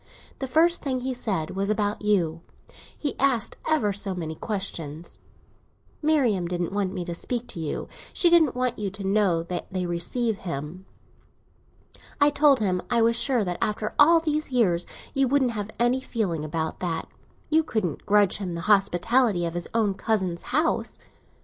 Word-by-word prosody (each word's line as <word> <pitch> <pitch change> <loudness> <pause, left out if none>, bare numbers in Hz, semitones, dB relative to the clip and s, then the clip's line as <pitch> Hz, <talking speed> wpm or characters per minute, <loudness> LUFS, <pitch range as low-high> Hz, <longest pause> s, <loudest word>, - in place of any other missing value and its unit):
The 265 - -3
first 330 +6 +3
thing 260 -3 -1
he 260 +1 -2
said 195 -10 -2
was 195 +1 -2
about 210 -1 0
you; 175 -6 +1 0.6
he 290 - -2
asked 260 -5 +1
ever 290 -11 +2
so 195 -1 -2
many 160 -3 -4
questions. 170 -5 -5 0.8
Marian 265 - +2
didn't 175 0 -2
want 200 -2 -1
me 180 -3 -4
to 170 - -4
speak 240 +7 -3
to - - -5
you; 155 -3 -3 0.2
she 355 - +2
didn't 335 -6 +5
want 250 -2 -1
you 205 -2 -1
to 200 +1 -8
know 195 -4 +2
that 175 +1 -5
they 185 -1 -2
receive 200 +6 -1
him. 170 +2 -6 1.3
I 290 0 +5
told 285 -2 +4
him 185 -3 +1
I 235 -2 +3
was 230 +1 +3
sure 240 -1 +2
that 180 -2 -3
after 215 0 -1
all 330 +3 +7
these 305 -2 -2
years 180 -9 +2 0.3
you 270 -1 +2
couldn't 265 -1 +2
have 210 -3 -4
any 240 +2 +3
feeling 195 -11 -2
about 160 +1 -3
that; 170 -3 -2 0.4
you 315 +1 +5
couldn't 220 - -2
grudge 205 -2 +4
him 185 -4 -4
the 170 - -4
hospitality 200 +1 +3
of 165 - -3
his 175 0 -3
own 220 -3 +1
cousin's 190 -4 -1
house. 310 +6 0
205 Hz, 170 wpm, -25 LUFS, 175-250 Hz, 1.3 s, all